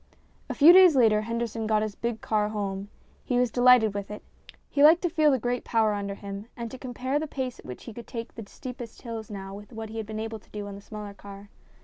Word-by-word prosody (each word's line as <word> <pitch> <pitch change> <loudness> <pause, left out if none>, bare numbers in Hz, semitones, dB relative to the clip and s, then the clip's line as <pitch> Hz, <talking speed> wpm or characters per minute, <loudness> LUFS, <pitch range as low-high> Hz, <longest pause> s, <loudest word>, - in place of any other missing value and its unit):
A - - -3
few 315 +4 +8
days 365 -4 +8
later 220 -4 +4
Henderson 230 0 -3
got 215 -1 +2
his 215 -1 -3
big 235 +1 -4
car 210 -1 0
home. 200 -2 -4 0.3
He 250 - 0
was 245 -2 +2
delighted 245 -3 +5
with 200 -1 -5
it. 210 - -8 0.4
He 285 - +1
liked 325 +4 +7
to 350 - 0
feel 310 -2 +4
the 270 - +3
great 245 +1 -2
power 220 -2 +2
under 200 -1 -3
him 200 +1 -8
and 235 -1 -5
to 260 - -9
compare 260 +2 -2
the 315 - -3
pace 260 -4 -4
at - - -14
which 125 - -8
he 230 - -9
could 235 +1 -10
take 230 -1 -6
the 225 -3 -9
steepest 250 -3 -9
hills 225 -3 -6
now 195 -2 -7
with 205 +3 -11
what 220 -1 -7
he 225 - -7
had 220 -2 -4
been 215 0 -5
able 220 0 -5
to - - -26
do 210 -1 -6
on 200 - -7
the 200 - -10
smaller 210 0 -8
car. 200 0 -12
225 Hz, 255 wpm, -27 LUFS, 205-250 Hz, 0.4 s, few